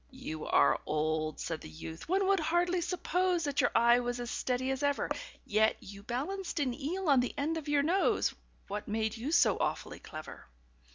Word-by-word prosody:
"You 250 - -6
are - - +4
old," 155 0 -1
said 165 -2 -3
the - - -9
youth, 160 - -9
"one 385 +2 +2
would 390 0 +3
hardly 345 +3 +1
suppose 360 0 0
That 285 -2 +1
your 245 - +3
eye 235 +1 +6
was 245 0 -2
as 240 -1 -4
steady 260 +1 -1
as 265 +1 -2
ever; 285 -1 0 0.3
Yet 220 +1 +3
you 200 +1 -11
balanced 300 - -3
an 265 -4 +1
eel 330 +8 -3
on 275 -3 +6
the 245 - -1
end 305 +3 0
of 315 -2 -5
your 290 -1 +3
nose 365 +6 +2 0.3
What 205 +1 -5
made 220 +1 -1
you 245 +6 -4
so 340 - +4
awfully - - -2
clever?" 155 - -9
260 Hz, 190 wpm, -31 LUFS, 220-330 Hz, 0.3 s, eye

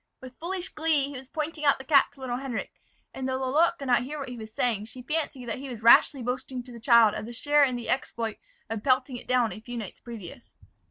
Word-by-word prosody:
With 255 -1 -11
foolish 365 +2 -3
glee, 310 -3 +1
he 285 - -8
was 260 0 -9
pointing 310 0 -4
out 280 -1 +4
the 265 - -9
cap 280 -1 +5
to 275 - -17
little 245 -2 -2
Henric; 260 -3 -4 0.4
and 265 0 -3
though 260 - 0
Lalotte 300 +7 +2
could 275 - -7
not 245 -2 +3
hear 285 +5 -5
what 275 -3 -5
he 245 - -6
was 220 -2 -9
saying, 220 -2 0
she 250 +3 -11
fancied 290 -4 -3
he 260 +4 -4
was 230 -3 -8
rashly 245 +3 +6
boasting 250 +1 -3
to 250 - -13
the 235 - -9
child 230 -2 +6
of 215 - -5
the 240 - -7
share 290 +4 +3
in 255 -3 +2
the 240 -1 -5
exploit 230 -4 -2 0.3
of 220 -2 -4
pelting 255 -1 +2
it - - -12
down 250 -3 +2
a - - -7
few 245 +1 -7
nights 215 -5 -7
previous. 220 -8 -10
255 Hz, 250 wpm, -27 LUFS, 235-280 Hz, 0.4 s, rashly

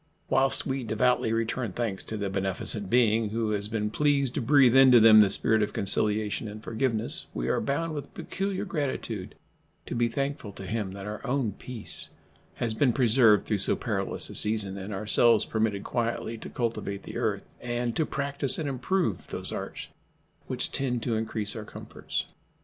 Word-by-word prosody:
Whilst 135 0 +3
we 135 -1 -2
devoutly 115 +1 +1
return 115 -1 -2
thanks 110 -4 -3
to 110 - -4
the 100 -1 -2
beneficent 95 +1 -2
Being 115 -2 +3
who 110 0 -2
has 100 -1 0
been 105 -1 -2
pleased 140 -1 +1
to 145 - -2
breathe 130 0 +5
into 130 -2 +8
them 110 -1 +8
the 105 -2 +6
spirit 110 +2 +2
of 105 0 -1
conciliation 105 +2 +1
and 105 +1 -9
forgiveness, 115 -1 +3
we - - -2
are - - +1
bound 160 +4 -2
with 145 -2 -6
peculiar 195 -1 -3
gratitude 130 - -4 0.5
to - - -6
be 120 -1 +1
thankful 135 -3 -4
to 95 - -9
Him 105 -2 -3
that 100 0 -8
our 105 0 -6
own 130 -4 -1
peace 115 +3 -7 0.5
has 115 -2 -2
been 120 +2 +2
preserved 115 -4 +4
through 105 -2 -1
so - - +3
perilous - - -2
a - - -9
season, 105 -2 +2
and 100 +1 -7
ourselves 105 +2 +3
permitted 110 -3 -1
quietly 115 -1 -2
to - - -8
cultivate 110 -4 -3
the - - -7
earth - - -1 0.2
and 120 -1 -3
to 160 - +1
practice 140 -2 0
and 155 - -3
improve 135 - -1
those - - -5
arts - - -6 0.6
which - - -2
tend 125 -4 -2
to 115 - -1
increase 110 -1 -1
our 110 - -5
comforts. - - -5
115 Hz, 180 wpm, -27 LUFS, 105-130 Hz, 0.6 s, into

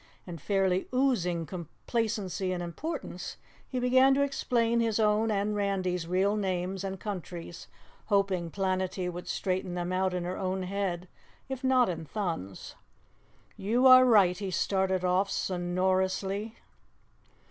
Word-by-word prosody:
And, 170 -4 -8
fairly 190 -1 +1
oozing 215 -11 +1
complacency 190 +2 -3
and 175 -1 -2
importance, 225 - -5 0.3
he 255 - -2
began 260 +2 +5
to 280 - +3
explain 235 -4 +1
his 225 -1 +1
own 215 +1 +3
and 210 0 0
Randy's 185 -4 -1
real 190 +4 +2
names 190 -2 -2
and 190 -1 -4
countries, 175 -4 -6 0.4
hoping 195 -4 +1
Planetty 185 0 -1
would 175 +1 -8
straighten 185 -1 -2
them 175 +1 -2
out 185 0 +1
in 180 - -2
her 180 +1 -4
own 190 0 -2
head, 185 -2 -2 0.4
if 265 0 -5
not 260 -2 +4
in 165 -3 -4
Thun's. 165 - -4 0.8
"You 235 +6 +1
are 255 0 +9
right," 200 -7 +5
he 200 -2 -3
started 190 0 0
off 185 +2 +2
sonorously. 190 +4 -1
190 Hz, 135 wpm, -29 LUFS, 180-215 Hz, 0.8 s, are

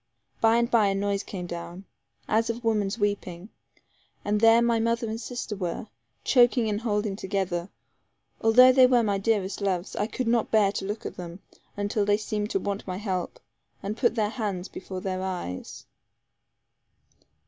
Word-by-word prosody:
By 225 0 +5
and 235 0 +1
by, 220 -4 +4
a 195 - +1
noise 200 0 0
came 185 -4 -6
down, 175 +2 -7 0.4
as 225 +1 +1
of 235 +1 -3
woman's 210 -2 0
weeping; 205 -3 -2 0.8
and 210 0 +1
there 225 0 +7
my 235 -1 +2
mother 230 +1 0
and 220 +1 -4
sister 245 -4 -5
were, 185 +2 -4 0.3
choking 245 -2 +4
and 210 0 -1
holding 210 -3 -1
together. 190 -2 -2 0.7
Although 250 +3 +7
they 255 0 +6
were 245 -2 +4
my 200 -2 0
dearest 200 -2 0
loves, 190 -2 -1
I 210 - 0
could 250 +1 -3
not 230 -1 +2
bear 210 -3 +4
to 195 - -4
look 210 +3 -5
at - - -6
them, 175 +1 -8 0.4
until 205 +1 0
they 205 0 +3
seemed 210 -1 -3
to 195 - 0
want 200 +1 -4
my 185 0 -3
help, 190 -3 -3 0.4
and 205 +2 -3
put 235 -1 +1
their 215 -2 0
hands 200 -6 -3
before 185 -1 -7
their 185 -1 -3
eyes. 180 - -5
205 Hz, 170 wpm, -26 LUFS, 195-225 Hz, 0.8 s, there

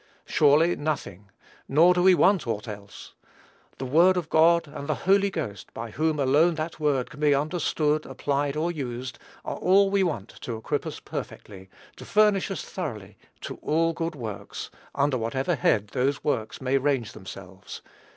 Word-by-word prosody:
Surely, 155 +4 +4
nothing; 105 - -4 0.4
nor 165 +6 +5
do 180 - +1
we 185 0 +6
want 185 -6 +3
aught 110 0 -3
else. 100 -1 -10 0.6
The 135 - -5
word 170 +8 +4
of 165 -3 -3
God, 170 +1 +4
and 140 0 -8
the 155 - +1
Holy 200 +1 +4
Ghost, 135 - -6
by 115 0 -6
whom 155 +4 0
alone 150 +5 +3
that 160 +1 -5
word 145 -5 0
can 140 - -12
be 150 -2 +4
understood, 155 0 0
applied, 140 +1 -1
or 165 +3 0
used, 130 -5 -5 0.3
are - - -4
all 195 +1 +4
we 200 -1 +2
want 155 - -2
to 115 -2 -4
equip 110 - -3
us - - -6
perfectly 95 -2 -8 0.3
to - - -10
furnish 210 -2 +3
us - - -4
thoroughly - - -6 0.3
"to - - -7
all 165 +2 +1
good 165 0 -3
works," 110 -7 -7 0.2
under 140 -2 +1
whatever 130 +9 -1
head 105 -7 +1
those 135 +3 -1
works 120 -8 -2
may 135 +1 +1
range 135 -6 0
themselves. 95 0 -10
145 Hz, 170 wpm, -26 LUFS, 125-165 Hz, 0.6 s, we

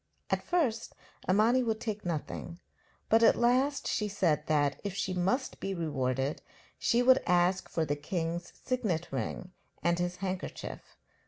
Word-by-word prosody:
At - - +2
first 290 -11 0 0.3
Imani 220 +7 +4
would 225 -3 -1
take 215 -3 -4
nothing, 170 +1 -4 0.5
but 225 +1 +5
at 230 - +6
last 265 +4 +2
she 210 - 0
said 170 -7 +1
that, 145 -2 +1
if 200 -2 -3
she 190 -1 -1
must 190 +10 0
be 195 0 -3
rewarded, 135 -4 -1 0.4
she 240 +1 +3
would 260 +1 +6
ask 180 +1 +2
for 165 - 0
the 145 0 0
king's 170 +3 -3
signet 210 -10 -1
ring 180 - -4 0.3
and 170 0 +2
his 175 0 -1
handkerchief. 185 0 -5
185 Hz, 150 wpm, -31 LUFS, 165-230 Hz, 0.5 s, at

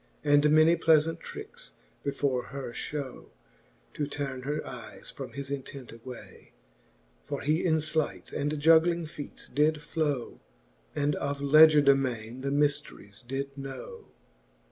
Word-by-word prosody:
And 145 0 +5
many 155 +2 +6
pleafant 160 -1 +3
trickes - - -9 0.3
before 140 -3 -1
her 135 -3 -6
Ihow, 135 +2 -5 0.7
To 145 - -2
turn 140 -3 -4
her 150 +3 -3
eyes 125 -3 -9
from 135 - -8
his 140 0 -6
intent 135 -2 -6
away: 120 +2 -12 0.7
For - - -4
he 155 +4 +1
in 160 -3 +3
flights 155 - -2
and 150 +1 -1
juggling 165 +2 +5
feates 150 -2 -9
did 150 +1 +2
flow. 150 -5 -2 0.5
And 145 0 +1
of 140 0 -2
legier 150 +1 +7
de 140 - +8
mayne 125 -2 -3
the 140 - -2
myfl:eries 145 -7 -1
did 135 +1 -4
know. 140 - -8
145 Hz, 135 wpm, -29 LUFS, 135-155 Hz, 0.7 s, de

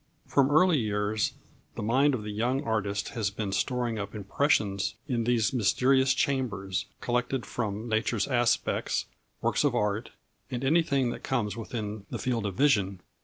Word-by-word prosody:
From 140 -1 +3
early 155 +1 +5
years 105 -1 0 0.4
the - - -4
mind 130 +6 +3
of 110 - -5
the 105 - -5
young 120 +6 0
artist 105 -2 -1
has 110 -4 -1
been 100 0 -4
storing 120 +2 -1
up 100 +1 -5
impressions 100 -2 +1
in 120 -5 0
these 120 0 +2
mysterious 130 +4 +3
chambers, 100 -9 -1
collected 125 +1 -1
from 110 -1 -3
nature's 110 -1 0
aspects, 120 -3 +1 0.4
works - - +1
of - - +2
art, 105 +2 0 0.4
and 125 -1 -4
anything 140 -4 +2
that - - -7
comes 120 -6 -1
within 110 -3 -5
the - - -3
field 115 -5 -1
of 95 - -5
vision. 100 -9 +2
115 Hz, 155 wpm, -28 LUFS, 105-130 Hz, 0.4 s, early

